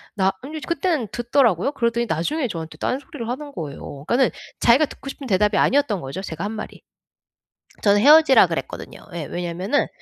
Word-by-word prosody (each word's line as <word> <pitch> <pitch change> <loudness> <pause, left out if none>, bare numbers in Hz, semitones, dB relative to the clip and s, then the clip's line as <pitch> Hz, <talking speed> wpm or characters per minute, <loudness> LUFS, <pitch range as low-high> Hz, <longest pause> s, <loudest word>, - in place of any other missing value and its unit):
나 190 -2 +2
인제 305 +2 -6
그때는 335 - 0
듣더라고요. 240 - +2
그러더니 235 -2 0
나중에 245 - -1
저한테 165 -3 -6
딴 260 - -1
소리를 285 -8 -8
하는 285 +4 -5
거예요. 140 - -7
그러니까는 245 +7 +3 0.3
자기가 255 +6 +5
듣고 275 - -10
싶은 275 0 -8
대답이 210 0 +2
아니었던 260 - +2
거죠 135 +8 -6
제가 165 +1 -5
한 210 - -3
말이. 215 -1 -7 1.0
저는 205 -1 +4
헤어지라 300 +1 +7
그랬거든요. - - -6
예. 165 -3 -4
왜냐하면은 180 - -1
235 Hz, 435 characters per minute, -22 LUFS, 185-280 Hz, 1.0 s, 헤어지라